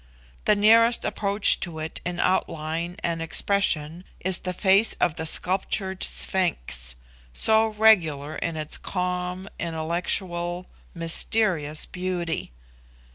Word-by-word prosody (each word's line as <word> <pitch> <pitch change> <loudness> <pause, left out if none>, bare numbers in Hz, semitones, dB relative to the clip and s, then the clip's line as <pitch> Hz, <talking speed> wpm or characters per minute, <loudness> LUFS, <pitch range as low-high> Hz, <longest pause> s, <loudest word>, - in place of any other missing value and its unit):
The 210 - +4
nearest 230 +3 +4
approach 200 0 +2
to 170 -3 -5
it 155 0 -5
in 175 0 -4
outline 165 -1 -1
and 165 -1 -2
expression 165 -1 0 0.2
is 185 0 -1
the 185 - -4
face 195 +4 +4
of 170 -3 0
the 160 -1 -4
sculptured 190 +2 -1
sphinx 65 - -1 0.4
so 220 - +4
regular 170 -10 +2
in 165 -1 -4
its 155 -1 -2
calm, 180 0 -4
intellectual, 175 +2 -2 0.3
mysterious 165 -2 +3
beauty. 180 -3 -4
180 Hz, 110 wpm, -24 LUFS, 160-190 Hz, 0.4 s, The